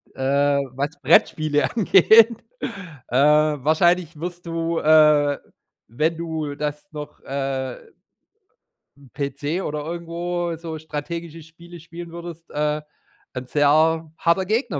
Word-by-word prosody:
Äh, 140 +1 +2 0.2
was 140 +2 -1
Brettspiele 150 0 +3
angeht, 225 +2 +5 0.6
äh, 120 - -5
wahrscheinlich 155 +3 +3
wirst 175 +1 -6
du, 165 0 -2
äh, 150 -2 +5 0.5
wenn 155 +8 -1
du 160 -3 -4
das 150 +3 -4
noch, 150 -1 -8
äh 135 - -4 1.1
'n 140 -2 -18
PC 145 +4 -3
oder 150 -4 -4
irgendwo 170 +1 -3
so 165 -1 -6
strategische 165 +2 -6
Spiele 170 +2 -14
spielen 170 +1 -10
würdest, 170 -1 -9
äh, 150 0 -1 0.5
'n 125 0 -5
sehr 155 +3 +2
harter 170 +3 +2
Gegner 215 - -1
155 Hz, 115 wpm, -22 LUFS, 145-170 Hz, 1.1 s, angeht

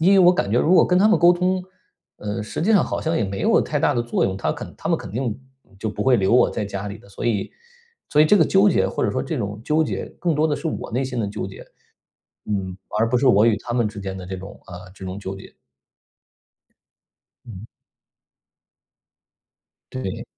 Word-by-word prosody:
因 185 +5 +5
为 195 - +6
我 180 -1 +7
感 100 - -1
觉 120 - +3
如 175 +4 +3
果 - - +7
跟 180 0 +2
他 205 - +5
们 220 - +5
沟 175 0 +6
通， 180 +1 0 0.5
呃， 105 +1 -4
实 110 - -5
际 215 +7 +2
上 200 - +5
好 - - -3
像 160 +1 -1
也 - - +1
没 95 0 -4
有 - - +4
太 - - -1
大 - - +2
的 120 - +1
作 120 - 0
用， 95 0 -1
他 - - -1
肯 - - -9
他 - - -5
们 - - +2
肯 - - -8
定 120 -2 -2 0.4
就 110 - -3
不 105 - -3
会 130 -2 +4
留 95 0 +1
我 125 - +5
在 105 - -3
家 100 0 -5
里 100 +2 -8
的。 100 - -19
所 100 - -8
以 110 -4 0 0.6
所 150 - +3
以 155 - +8
这 205 - +5
个 165 - +5
纠 195 +4 +4
结 - - +2
或 - - -2
者 - - +1
说 - - -1
这 - - -4
种 105 +1 -4
纠 155 +1 +2
结 - - -4
更 170 -3 0
多 155 +2 +2
的 145 - 0
是 165 - -5
我 155 - -4
内 130 +4 -1
心 125 -2 -3
的 105 - -1
纠 105 -2 -5
结， 95 - -11 0.8
嗯， 95 -3 -3 0.2
而 115 +1 +2
不 125 - +1
是 130 +1 +3
我 105 0 +5
与 110 -2 +3
他 120 - -6
们 120 -2 +1
之 105 -1 -6
间 95 -1 -5
的 90 - -8
这 95 0 -5
种 95 +2 -10
呃， 90 +1 -10
这 95 - -10
种 95 +1 -5
纠 95 -1 -5
结。 95 - -13 1.9
嗯。 110 -2 -10 2.3
对。 130 -8 -5
115 Hz, 255 characters per minute, -22 LUFS, 100-155 Hz, 2.3 s, 以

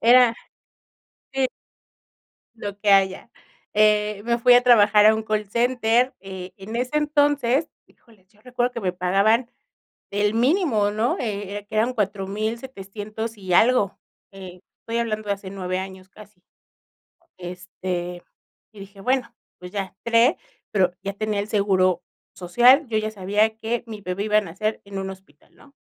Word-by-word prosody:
era 240 0 +6 1.0
sí 270 -1 +1 1.1
lo 205 -3 -6
que 210 - 0
haya. 195 +2 +3 0.4
Eh, 210 -1 +3
me 235 0 +1
fui 245 +1 +5
a 245 - +6
trabajar 210 -4 +6
a 215 - +7
un 220 - -3
call 215 -1 -1
center, 240 +1 +2
eh, 190 -1 -8
en 210 +4 -6
ese 250 +5 -1
entonces, 290 -1 +2 0.2
híjole, 220 -6 -25
yo 210 -1 -28
recuerdo 245 +1 -1
que 235 - -5
me 185 -4 -2
pagaban 200 +7 +2 0.6
el 205 +1 0
mínimo, 245 - +2
¿no? 220 +4 0
Eh, 205 -4 -4
era 205 0 -5
que 205 - -7
daban 235 +4 +1
$4,700 215 +1 -4
y 190 -2 -5
algo. 220 -2 +3 0.4
Eh, 185 -2 -11 0.2
estoy 230 +1 -3
hablando 215 -2 -2
de 200 - +2
hace 195 -1 -10
9 185 -1 -3
años 190 0 -8
casi, 205 -2 -17 1.0
este, 180 0 -6 0.5
y 210 - -14
dije: 195 0 -12
"Bueno, 250 0 0 0.2
pues 180 0 -10
ya". 195 -3 -4
Entré, 235 +5 +4 0.3
pero 185 -4 +2
ya 200 +1 -3
tenía 210 0 -2
el 205 - -5
seguro 185 -4 +2 0.3
social. 245 - +4
Yo 225 - -1
ya 215 0 -2
sabía 210 +2 0
que 230 +1 -3
mi 220 -2 -8
bebé 190 +1 -3
iba 210 0 +3
a - - +4
nacer 210 +4 -3
en 200 -1 -7
un 190 0 -4
hospital, 190 -6 -16
¿no? 280 - -20
210 Hz, 160 wpm, -23 LUFS, 195-235 Hz, 1.1 s, a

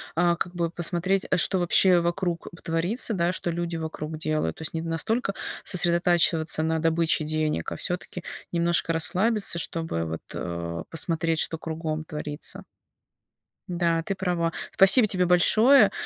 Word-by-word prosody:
а, 175 +1 +2
как 175 0 -4
бы 170 -2 -2
посмотреть, 175 +3 -1
э, 185 - +3
что 190 - +3
вообще 180 0 +4
вокруг 170 0 -2
б 175 - -15
творится, 175 +9 -1
да, 170 -1 +1
что 180 -1 -3
люди 170 0 -3
вокруг 160 -1 -6
делают, 155 - -2
то - - -12
есть 160 - -4
не 160 - -2
настолько 195 +7 -2 0.3
сосредотачиваться 170 -3 +2
на 160 0 0
добыче 165 0 +1
денег, 155 - -2
а - - -4
всё-таки 180 - -5 0.3
немножко 170 -1 +1
расслабиться, 195 +4 +1
чтобы, 165 - -2
вот, 80 0 -5
э, 85 -1 -5
посмотреть, 165 0 0
что 165 - +2
кругом 160 -1 -5
творится. 150 -1 -5 1.0
Да, 170 -2 0
ты 195 - -3
права. 175 -3 -1 0.2
Спасибо 205 +4 +6
тебе 185 -2 +1
большое. 215 +7 +6
170 Hz, 150 wpm, -25 LUFS, 160-180 Hz, 1.0 s, Спасибо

